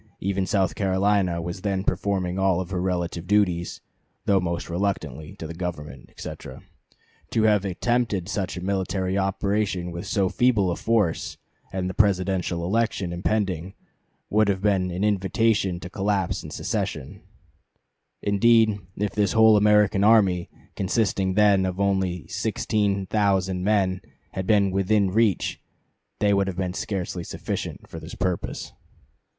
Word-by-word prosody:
Even 95 -1 -1
South 95 -4 +1
Carolina 95 -3 +1
was 85 +2 -5
then 95 -2 -1
performing 95 -2 -1
all 95 -1 +2
her 90 0 -3
relative 90 -2 -2
duties, 90 -4 +1 0.4
though 100 -1 +4
most 85 -1 -3
reluctantly, 85 -6 -3
to - - -8
the 80 - -6
Government," 80 -6 -6
etc. 65 - -9 0.7
"To 110 - +1
have 105 -2 +4
attempted 105 -1 0
such 95 -3 -3
a - - -5
military 95 -1 -1
operation 95 -2 -1
with 85 0 -6
so 100 -3 +1
feeble 105 -4 +2
a - - -1
force, 105 -7 0 0.3
and 95 -1 -2
the 95 - -3
Presidential 95 -3 +1
election 100 -3 0
impending, 95 -1 -1 0.6
would 110 0 +4
have 100 -1 0
been 95 -3 +2
an 90 +3 -3
invitation 100 -1 +1
to 90 - -6
collision 95 0 -1
and - - -10
secession. 65 - -3 1.0
Indeed, 110 +1 +4 0.2
if 105 -1 -1
the 105 -1 +2
whole 110 +2 +6
American 105 -1 +4
army, 100 -5 +4 0.3
consisting 95 -1 0
then 100 -2 +4
of 95 0 -2
only 95 -4 0
sixteen 100 -2 -1
thousand 95 -3 +1
men, 95 -3 +1 0.3
had 95 -1 -4
been 100 -3 +3
'within 95 +1 +2
reach' 110 -2 +1 0.6
they 105 -1 +2
would 100 -1 +2
have 95 -2 -4
been 90 -1 -2
scarcely 95 -3 -3
sufficient - - -5
for - - -8
this - - -9
purpose." 90 -2 -3
95 Hz, 140 wpm, -24 LUFS, 90-105 Hz, 1.0 s, whole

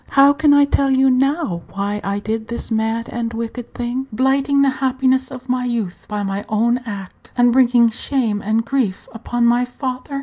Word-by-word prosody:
How 280 +1 +6
can 300 0 +3
I 285 0 +6
tell 280 -1 +1
you 265 0 +4
now 270 - 0
why 200 +1 -2
I 200 +1 -2
did 220 +2 -3
this 235 0 -5
mad 225 +1 -1
and 235 -1 -3
wicked 230 +1 -6
thing, 245 +2 -3
blighting 270 +4 +2
the 275 - +3
happiness 260 0 +1
of 255 -1 -10
my 250 0 0
youth 225 -7 -3
by 210 -1 -2
my 195 +1 -3
own 235 +3 +1
act, 195 -4 -8
and 245 -1 +4
bringing 245 -2 +5
shame 225 -2 -1
and 220 +2 0
grief 240 -8 -1
upon 235 +1 -1
my 240 +1 +3
father? 255 +2 -5
245 Hz, 190 wpm, -19 LUFS, 220-265 Hz, -, How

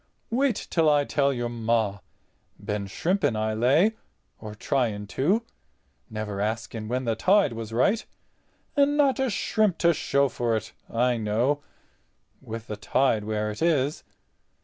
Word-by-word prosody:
Wait 260 0 +2 0.2
till 165 -2 +3
I 145 -1 +3
tell 140 -1 +1
your 120 -2 -2
Ma—been 105 -2 -4
shrimping 160 - 0
I 110 0 -1
lay—or 125 - -1
trying 110 -3 -1
to—never 110 - -4
asking 110 +1 -3
when 125 +3 -2
the 115 -1 0
tide 190 - +3
was 115 -1 -6
right. 195 - +2 0.7
And 290 0 +3
not 280 -2 +3
a 265 -1 +1
shrimp 205 -2 +1
to 170 0 +4
show 140 -2 +1
for 120 -3 -1
it, 110 +1 -7 0.2
I 120 +1 +1
know, 115 +7 0 0.8
with 115 0 -7
the 105 -3 -6
tide 110 0 +1
where 105 0 -1
it 105 - -9
is. 150 -3 +1
120 Hz, 135 wpm, -26 LUFS, 110-165 Hz, 0.8 s, to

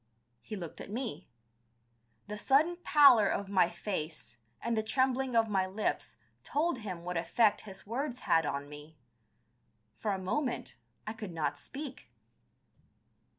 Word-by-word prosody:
He 215 - -6
looked 175 -5 -7
at - - -9
me. 235 +2 -4 1.0
The 210 - -4
sudden 305 +9 +3
pallor 280 - +7
of 200 0 -1
my 185 -3 +4
face 155 - -5 0.2
and 235 0 -1
the 220 - +2
trembling 260 +2 +1
of 225 -1 +4
my 190 -3 +1
lips 195 - -2 0.3
told 300 -1 0
him 185 -6 -6
what 180 0 -3
effect 205 +6 +3
his 190 - -10
words 250 +3 -3
had 165 - +3
on 140 -1 -3
me. 150 +2 -12 1.0
For 215 - -2
a 195 - 0
moment 240 +8 -2 0.3
I 215 - -3
could 215 -4 -7
not 160 -2 -1
speak. 275 -1 -7
210 Hz, 145 wpm, -32 LUFS, 175-255 Hz, 1.0 s, pallor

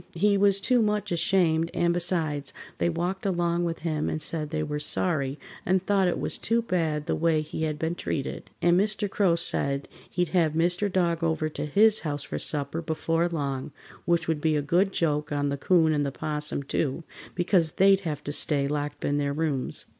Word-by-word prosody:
He 200 +4 +3
was 200 0 +3
too 245 +4 +3
much 210 -2 0
ashamed, 165 -1 +2
and, 170 0 +2
besides, 160 -5 -1 0.2
they - - +2
walked 175 +3 -2
along 175 -2 0
with 165 -3 -3
him 155 -2 -1
and 155 - -2
said 155 -1 -3
they 155 -1 -2
were 150 -1 -3
sorry 150 -3 -1 0.3
and 185 +1 +2
thought 195 -2 +2
it 175 - -1
was - - -2
too 230 +1 +1
bad 160 -7 -1
the - - 0
way 160 -1 +2
he 155 +1 -4
had 155 -1 -2
been 160 +2 -1
treated, 140 -5 -4
and 175 +1 +4
Mr. 210 +1 0
Crow 195 -3 +2
said 140 -4 0 0.2
he'd 180 -2 -1
have 165 -4 +2
Mr. 175 +5 +1
Dog 170 -2 0
over 160 -1 0
to 150 - -5
his 215 +7 +5
house 145 -3 -3
for - - -5
supper 150 +2 +1
before 165 +1 0
long, 140 -5 -3 0.3
which 170 -2 +1
would 160 -2 -1
be 155 -1 +2
a 150 - +1
good 180 +7 +2
joke 150 -4 -1
on 145 0 0
the 140 - -1
'Coon 160 +1 +3
and 145 -2 0
'Possum, 150 0 -3
too, 140 +3 -2 0.3
because 175 -3 +2
they'd 195 0 +5
have 160 -6 -4
to 145 - -4
stay 145 -1 +2
locked 145 0 -3
in 145 0 +1
their 140 -1 -1
rooms. 145 -4 -2
165 Hz, 200 wpm, -26 LUFS, 150-180 Hz, 0.3 s, his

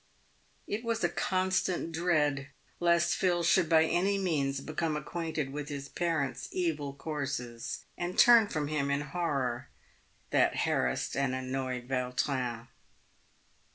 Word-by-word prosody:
It 215 +3 -3
was 230 -1 -1
a - - +3
constant 185 -2 0
dread 150 -5 +1 0.3
lest 170 0 +3
Phil 175 -2 +1
should 170 0 +3
by 160 -1 +6
any 195 +5 +1
means 145 -8 0
become 155 +2 -2
acquainted 155 -2 -3
with 145 0 -5
his 140 -1 -5
parent's 145 -7 -1
evil 150 -6 -2
courses, 135 -6 -4
and 175 +1 -3
turn 235 -3 +8
from 150 -6 -2
him 145 -2 -1
in 140 +1 +1
horror, 140 -5 -2 0.6
that - - +3
harassed - - 0
and 135 -2 0
annoyed 130 -1 -3
Vautrin. 125 -2 -1
150 Hz, 125 wpm, -31 LUFS, 135-175 Hz, 0.6 s, turn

